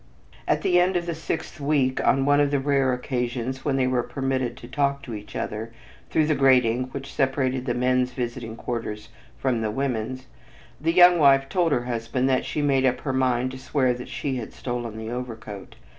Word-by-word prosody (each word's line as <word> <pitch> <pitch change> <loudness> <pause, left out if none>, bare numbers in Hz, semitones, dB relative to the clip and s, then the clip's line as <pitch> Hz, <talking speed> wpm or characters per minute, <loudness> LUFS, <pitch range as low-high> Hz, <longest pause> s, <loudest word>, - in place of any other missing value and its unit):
At - - +1
the 180 0 +4
end 180 +1 +2
of 175 -1 0
the 170 - -2
sixth 160 -2 -4
week, 140 -3 +1
on 135 +1 +3
one 145 0 +4
of 145 -1 +3
the 140 -1 +1
rare 135 -1 +2
occasions 125 0 -3
when 140 -2 0
they 130 -1 +2
were 130 -1 +1
permitted 130 -1 -2
to 120 - -10
talk 140 +1 0
to 120 - -7
each 105 -1 -8
other 110 +2 -4 0.4
through 155 - +2
the 155 - +2
grating 130 -3 +3
which 135 +1 -8
separated 130 -1 0
the 120 - 0
men's 125 0 +1
visiting 120 -2 -4
quarters 110 -3 -5 0.3
from 125 -4 0
the 110 - -1
women's, 130 +1 -2 0.6
the 165 +2 +2
young 175 0 +7
wife 135 -2 +5
told 175 -3 +1
her 120 -3 +1
husband 120 +2 -1
that 130 -1 +1
she 150 - -2
made 135 -2 +2
up 130 -1 +1
her 135 - -2
mind 130 -1 +1
to 130 - -8
swear 130 -1 +1
that 125 0 -8
she 135 -3 -3
had 115 - -6
stolen 120 -3 -4
the 110 +1 -5
overcoat. 110 -5 -7
130 Hz, 205 wpm, -25 LUFS, 120-140 Hz, 0.6 s, young